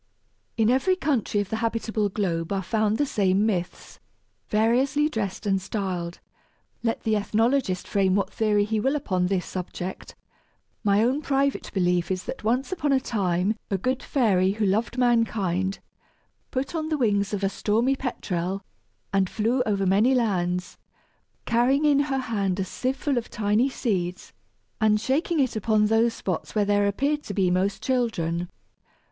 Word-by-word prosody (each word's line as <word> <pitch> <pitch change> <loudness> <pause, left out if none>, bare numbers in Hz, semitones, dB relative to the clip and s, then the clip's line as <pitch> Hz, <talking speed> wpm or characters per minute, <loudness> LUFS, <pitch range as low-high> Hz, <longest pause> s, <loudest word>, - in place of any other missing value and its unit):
In 225 +1 +3
every 270 +9 +2
country 260 - 0
of 200 - -5
the 220 - -2
habitable 225 -2 -1
globe 175 -5 -2
are 195 -1 -1
found 215 +3 +1
the 290 - +2
same 200 -5 +2
myths, 180 -5 -3 0.5
variously 255 +7 +2
dressed 215 -7 -4
and 195 -2 +1
styled. 185 -4 -4 0.6
Let 230 -1 -1
the 220 -1 +1
ethnologist 215 -1 +1
frame 190 -2 +2
what 195 -1 0
theory 210 -2 +2
he 220 +1 -1
will 265 +7 +1
upon 185 -10 0
this 185 -1 -1
subject, 185 0 -6 0.7
my 205 0 +3
own 260 +5 +1
private 275 -1 0
belief 180 -2 +1
is 185 -1 -2
that - - -7
once 245 - 0
upon 300 -6 0
a 270 - +4
time 195 -4 0
a 195 - 0
good 255 +7 -1
fairy 195 -8 +2
who 215 0 -1
loved 220 +5 0
mankind 205 -6 +1 0.7
put 270 +4 -3
on 315 -2 -2
the 310 - 0
wings 205 -6 +1
of 205 -1 -3
a - - +4
stormy 225 +7 +1
petrel 195 -7 -3 0.5
and 195 -2 +2
flew 230 +4 0
over 200 -2 +1
many 210 +8 +4
lands, 180 -6 -1 0.7
carrying 250 +5 +2
in 290 -2 +4
her 280 -2 0
hand 200 -7 -1
a 190 - 0
sieve 260 +7 -2
full 275 -3 0
of 230 - -10
tiny 215 +5 +1
seeds, 185 -9 -3 0.5
and 215 -1 +3
shaking 310 - 0
it 260 -4 +1
upon 215 0 +2
those 225 +2 +2
spots 185 +2 -4
where 210 -1 +3
there 205 0 +2
appeared 280 +9 0
to 205 - -7
be 185 -3 +2
most 190 +2 0
children. 180 -10 -1
215 Hz, 165 wpm, -25 LUFS, 190-250 Hz, 0.7 s, a